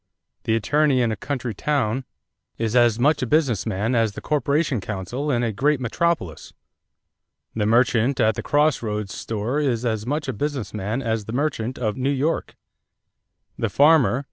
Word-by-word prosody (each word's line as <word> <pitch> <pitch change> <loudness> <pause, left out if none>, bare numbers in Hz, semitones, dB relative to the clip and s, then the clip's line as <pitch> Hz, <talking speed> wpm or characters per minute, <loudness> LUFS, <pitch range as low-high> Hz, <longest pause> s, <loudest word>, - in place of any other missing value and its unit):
The 110 - +2
attorney 140 +3 +2
in 115 - +1
a - - -1
country 125 +1 -4
town 130 0 -1 0.5
is 115 0 -1
as 120 -3 +4
much 145 +5 +2
a 125 - -1
business 125 - +1
man 110 +3 -1
as 115 -3 +1
the - - -7
corporation 145 -3 0
counsel 110 +9 -4
in 120 -3 +1
a 115 - 0
great 140 +7 +1
metropolis. 125 - -2 1.0
The 105 -2 -1
merchant 120 +2 +2
at 110 +1 +3
the - - -5
cross 150 0 +2
roads 105 -3 -3
store 115 +6 -3
is 125 -5 0
as 110 -1 -2
much 150 +2 -2
a 130 - -2
business 135 -1 -3
man 105 +5 -3
as 110 -2 -1
the 110 - -6
merchant 130 -3 -2
of 110 -4 -2
New 130 +1 0
York. 145 +4 -1 1.0
The - - 0
farmer... 145 -4 +4
120 Hz, 170 wpm, -23 LUFS, 110-145 Hz, 1.0 s, as